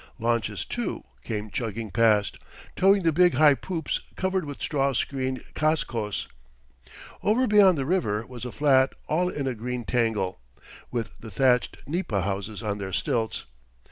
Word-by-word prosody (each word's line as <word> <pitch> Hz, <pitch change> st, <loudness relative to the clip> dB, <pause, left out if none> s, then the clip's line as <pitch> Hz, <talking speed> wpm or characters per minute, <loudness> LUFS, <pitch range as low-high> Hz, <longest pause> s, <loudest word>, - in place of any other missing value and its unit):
Launches, 115 Hz, -3 st, -1 dB
too, -, -, -3 dB, 0.2 s
came 105 Hz, -2 st, -4 dB
chugging 115 Hz, -2 st, -3 dB
past, 110 Hz, -3 st, +3 dB, 0.4 s
towing 195 Hz, 0 st, +4 dB
the 165 Hz, -, +4 dB
big 180 Hz, +2 st, +4 dB
high 150 Hz, -2 st, +7 dB
poops 165 Hz, +2 st, -3 dB
covered 190 Hz, -2 st, -1 dB
with 145 Hz, -1 st, -7 dB
straw 140 Hz, -2 st, 0 dB
screened 130 Hz, +1 st, -2 dB
cascos. 120 Hz, -9 st, -1 dB, 0.9 s
Over 230 Hz, +5 st, +3 dB
beyond 205 Hz, -6 st, +6 dB
the 135 Hz, -, -1 dB
river 115 Hz, -, 0 dB
was 125 Hz, -1 st, -9 dB
a 125 Hz, -, -4 dB
flat 135 Hz, -2 st, +3 dB
all 180 Hz, +4 st, +1 dB
in 145 Hz, -5 st, -3 dB
a 130 Hz, -, 0 dB
green 125 Hz, +2 st, -4 dB
tangle, 110 Hz, -, 0 dB, 0.5 s
with 115 Hz, -5 st, -4 dB
the 115 Hz, -, -9 dB
thatched 125 Hz, +4 st, +2 dB
nipa 145 Hz, -, -1 dB
houses 100 Hz, +3 st, -3 dB
on 105 Hz, -1 st, -2 dB
their 95 Hz, -1 st, -4 dB
stilts. 110 Hz, -, -1 dB
125 Hz, 150 wpm, -26 LUFS, 110-155 Hz, 0.9 s, high